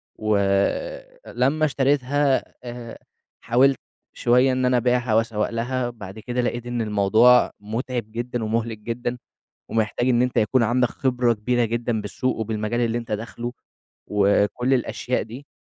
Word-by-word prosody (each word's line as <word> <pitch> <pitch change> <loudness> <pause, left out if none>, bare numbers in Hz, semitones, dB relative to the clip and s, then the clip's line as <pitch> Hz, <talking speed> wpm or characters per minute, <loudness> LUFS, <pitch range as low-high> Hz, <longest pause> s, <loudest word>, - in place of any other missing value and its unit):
و 110 -1 +1 0.9
لمّا 145 +5 +1
اشتريتها 140 0 +1 0.2
آآ 120 -1 -8 0.5
حاولت 130 +3 +3 0.3
شوية 125 +2 +3
إن 130 0 0
أنا 125 0 +3
أبيعها 125 -1 +1
وأسوّق 110 -2 +1
لها، 120 +2 -2
بعد 105 -3 -10
كده 125 +3 -2
لقيت 120 0 -2
إن 120 -1 -2
الموضوع 110 +4 +4
متعب 115 +1 -4
جدًا، 120 0 -3
ومُهلك 115 0 -1
جدًا، 120 +2 -4 0.5
ومحتاج 115 +3 0
إن 120 -1 +3
أنت 125 0 -1
يكُون 115 +3 +3
عندك 120 +2 +2
خبرة 125 -2 +1
كبيرة 120 +3 0
جدًا 115 0 -1
بالسوق 105 +5 -2
وبالمجال 110 +1 -2
اللي 120 0 0
أنت 115 -2 -7
داخله، 120 +3 -4 0.5
وكُلّ 105 +5 +2
الأشياء 125 0 -1
دي. 125 +6 -10
120 Hz, 140 wpm, -23 LUFS, 110-125 Hz, 0.9 s, الموضوع